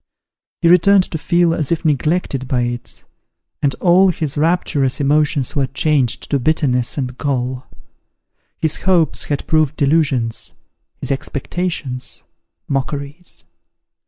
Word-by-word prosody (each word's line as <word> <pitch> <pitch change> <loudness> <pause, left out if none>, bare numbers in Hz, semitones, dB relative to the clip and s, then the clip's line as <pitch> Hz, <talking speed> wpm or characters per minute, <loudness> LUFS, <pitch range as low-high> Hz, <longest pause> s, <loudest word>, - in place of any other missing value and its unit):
He - - +5
returned 185 +3 +6
to 160 - -2
feel 170 +1 +2
as 155 -3 -2
if 170 0 -1
neglected 150 -2 0
by 125 -2 0
it, 120 -2 -4 0.6
and 140 -2 +1
all 185 +1 +4
his 155 -5 -2
rapturous 150 -4 +1
emotions 145 -1 +1
were 140 -2 +1
changed 135 -2 0
to 140 - +2
bitterness 125 -4 +1
and 130 -2 -3
gall. 130 -3 -2 0.9
His 155 -1 -1
hopes 175 -5 +1
had 145 -2 -3
proved 155 -2 +2
delusions 140 -6 +1 0.5
his - - -3
expectations, 135 -1 -3 0.4
mockeries. 140 +4 -4
145 Hz, 120 wpm, -18 LUFS, 130-165 Hz, 0.9 s, returned